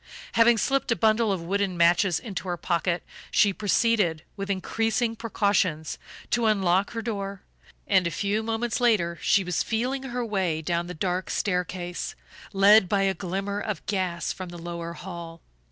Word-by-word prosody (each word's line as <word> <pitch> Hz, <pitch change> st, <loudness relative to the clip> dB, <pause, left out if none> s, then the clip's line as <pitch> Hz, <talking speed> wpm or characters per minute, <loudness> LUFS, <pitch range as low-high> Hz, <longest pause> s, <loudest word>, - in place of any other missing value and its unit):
Having 230 Hz, 0 st, +5 dB
slipped 270 Hz, +2 st, 0 dB
a -, -, +4 dB
bundle 220 Hz, -1 st, +3 dB
of 185 Hz, -4 st, -2 dB
wooden 195 Hz, 0 st, -1 dB
matches 170 Hz, +1 st, +4 dB
into 200 Hz, -5 st, -6 dB
her 175 Hz, -1 st, -2 dB
pocket 170 Hz, +1 st, -1 dB, 0.3 s
she 200 Hz, -2 st, +4 dB
proceeded, 205 Hz, -5 st, +1 dB
with 195 Hz, 0 st, -5 dB
increasing 225 Hz, +4 st, 0 dB
precautions, 200 Hz, -8 st, 0 dB, 0.3 s
to 235 Hz, -2 st, +2 dB
unlock 195 Hz, -1 st, +2 dB
her 225 Hz, -1 st, -4 dB
door, 200 Hz, -4 st, -4 dB, 0.4 s
and 190 Hz, -3 st, +3 dB
a -, -, 0 dB
few 200 Hz, +5 st, -1 dB
moments 225 Hz, +2 st, -2 dB
later 185 Hz, -8 st, +2 dB
she 200 Hz, -, +3 dB
was 180 Hz, -1 st, -1 dB
feeling 250 Hz, +4 st, -1 dB
her 250 Hz, -2 st, -3 dB
way 190 Hz, -7 st, 0 dB
down 170 Hz, +2 st, -1 dB
the 180 Hz, -, -6 dB
dark 180 Hz, +3 st, -2 dB
staircase, 180 Hz, -2 st, -2 dB, 0.4 s
led 200 Hz, -1 st, +6 dB
by 200 Hz, -1 st, +2 dB
a 195 Hz, 0 st, +2 dB
glimmer 195 Hz, +3 st, -3 dB
of 210 Hz, -1 st, -4 dB
gas 185 Hz, -4 st, -1 dB
from 185 Hz, -1 st, -7 dB
the 175 Hz, -, -9 dB
lower 170 Hz, 0 st, -6 dB
hall. 170 Hz, -2 st, -8 dB
195 Hz, 165 wpm, -26 LUFS, 175-220 Hz, 0.4 s, led